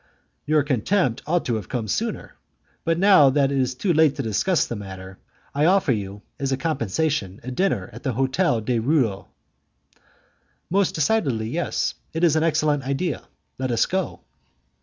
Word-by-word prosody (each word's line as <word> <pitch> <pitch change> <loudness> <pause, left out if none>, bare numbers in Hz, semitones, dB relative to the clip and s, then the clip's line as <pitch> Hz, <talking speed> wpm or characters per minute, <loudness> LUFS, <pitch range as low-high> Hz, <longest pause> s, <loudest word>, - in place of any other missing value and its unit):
"Your 155 -1 +3
contempt 135 - 0
ought 175 +2 +1
to 120 - 0
have 105 - -8
come 120 -4 -3
sooner. 225 - -3 0.5
But, 165 -1 +1
now 185 -7 +6
that 140 0 +2
is 130 -2 0
too 175 +6 0
late 155 -2 +4
to 140 - -3
discuss 115 - +1
the 120 - -5
matter, 95 -2 -9 0.3
I 145 +2 +2
offer 185 -4 +3
you, 100 -2 -4 0.2
as 135 -1 -1
a 135 - +1
compensation, 140 - -1
a 130 - -5
dinner 125 - 0
at 115 - -10
the 130 - -2
Hotel 130 - +1
du 115 +1 0
Roule." 115 -7 0 1.4
"Most 195 0 +2
decidedly 145 - +1
yes; 170 +7 -1 0.2
it 165 +2 -2
is 165 -3 +4
an 155 - +2
excellent 155 -2 +1
idea. 140 +5 -3 0.3
Let 130 -1 -1
us 115 -1 +2
go." 190 -1 -3
140 Hz, 165 wpm, -23 LUFS, 115-165 Hz, 1.4 s, now